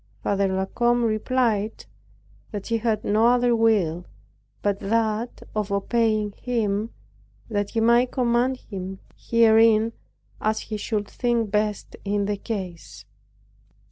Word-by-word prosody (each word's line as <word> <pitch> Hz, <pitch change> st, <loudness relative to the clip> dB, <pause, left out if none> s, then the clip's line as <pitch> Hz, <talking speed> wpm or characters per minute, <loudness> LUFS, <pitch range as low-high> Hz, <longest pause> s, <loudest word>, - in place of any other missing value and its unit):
Father 200 Hz, -1 st, +1 dB
La 190 Hz, 0 st, -1 dB
Combe 240 Hz, +4 st, +1 dB
replied 225 Hz, -1 st, 0 dB, 0.6 s
that 205 Hz, -2 st, -6 dB
he 230 Hz, -1 st, 0 dB
had 225 Hz, -1 st, 0 dB
no 215 Hz, +3 st, +3 dB
other 245 Hz, 0 st, +3 dB
will 195 Hz, -7 st, +1 dB, 0.6 s
but 200 Hz, -1 st, 0 dB
that 225 Hz, +2 st, -1 dB
of 210 Hz, -1 st, -2 dB
obeying 215 Hz, +1 st, +1 dB
him, 220 Hz, -2 st, -1 dB, 0.6 s
and 220 Hz, -, -6 dB
that 205 Hz, 0 st, -2 dB
he 225 Hz, -, -1 dB
might 235 Hz, +2 st, +4 dB
command 250 Hz, +1 st, +1 dB
him 190 Hz, -4 st, -7 dB, 0.2 s
herein 225 Hz, -1 st, +4 dB, 0.5 s
as 215 Hz, 0 st, +1 dB
he 215 Hz, -, -5 dB
should 210 Hz, -1 st, -2 dB
think 235 Hz, -3 st, -1 dB
best 210 Hz, -1 st, -1 dB
in 205 Hz, 0 st, 0 dB
the 205 Hz, 0 st, -1 dB
case. 170 Hz, -, -6 dB
215 Hz, 130 wpm, -24 LUFS, 200-230 Hz, 0.6 s, might